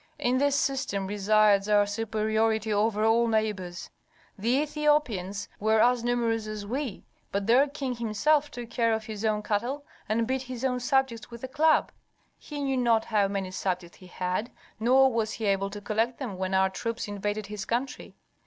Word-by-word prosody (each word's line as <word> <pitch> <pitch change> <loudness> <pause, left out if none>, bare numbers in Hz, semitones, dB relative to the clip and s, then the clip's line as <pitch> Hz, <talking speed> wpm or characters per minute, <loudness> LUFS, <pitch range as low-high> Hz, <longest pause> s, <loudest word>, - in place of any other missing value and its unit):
"In 250 +1 +1
this 285 0 +2
system 265 -9 -1
resides 205 0 +3
our 205 -1 +5
superiority 220 +1 0
over 215 +1 +1
all 230 +1 +4
neighbors. 210 -6 -2 0.4
The 215 +4 -2
Ethiopians 295 -10 0
were 220 +1 +3
as 245 +1 +3
numerous 230 -2 0
as 215 -1 -5
we, 250 0 -4 0.3
but 200 0 -1
their 250 +6 +5
king 275 -3 -4
himself 285 +7 +1
took 240 -4 -8
care 230 -1 +2
of 220 0 -5
his 215 -1 -6
own 215 -1 0
cattle, 245 +8 -2 0.2
and 225 +2 +1
beat 260 +2 -1
his 255 -1 -5
own 250 -1 0
subjects 245 -3 0
with 235 0 -11
a - - -3
club; 305 +4 +3 0.5
he 295 -1 -7
knew 270 -1 0
not 230 -3 +2
how 210 -3 +2
many 195 -2 -3
subjects 180 -2 -3
he 185 - -13
had, 180 +5 -2 0.3
nor 260 +3 +4
was 220 -1 -1
he 225 - -4
able 195 -1 +1
to 205 +1 -7
collect 225 +4 -1
them 245 -8 -5
when 190 +1 -2
our 190 0 +3
troops 230 +5 -4
invaded 205 +1 -3
his 210 0 -6
country. 245 +5 -3
220 Hz, 180 wpm, -27 LUFS, 205-250 Hz, 0.5 s, our